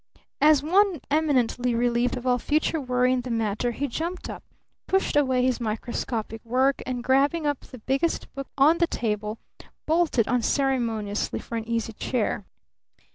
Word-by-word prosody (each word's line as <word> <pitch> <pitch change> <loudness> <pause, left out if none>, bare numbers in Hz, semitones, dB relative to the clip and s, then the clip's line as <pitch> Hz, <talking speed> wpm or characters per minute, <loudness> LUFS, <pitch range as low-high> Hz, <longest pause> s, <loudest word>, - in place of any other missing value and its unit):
As 300 -1 +5
one 375 +1 +3
eminently 250 -5 +1
relieved 240 +1 +1
of 250 - -7
all 250 -1 +2
future 305 +3 0
worry 250 -1 +2
in 255 - 0
the 250 - -7
matter, 225 0 0
he 275 +4 -2
jumped 335 +8 -4
up, - - -9 0.4
pushed 385 -4 +1
away 260 -3 +3
his 255 -1 +1
microscopic 225 0 -3
work, 260 +4 +1
and, 250 -2 -3
grabbing 280 +5 +2
up 290 -2 0
the 255 - -12
biggest 270 +8 -1
book 275 -1 -6
on 305 +5 +5
the 340 - +3
table, 215 -3 -2 0.5
bolted 315 -8 +2
unceremoniously 235 -4 0
for 235 - -7
an 225 -1 -4
easy 230 -1 -2
chair. 210 -3 -2
250 Hz, 155 wpm, -25 LUFS, 230-290 Hz, 0.5 s, As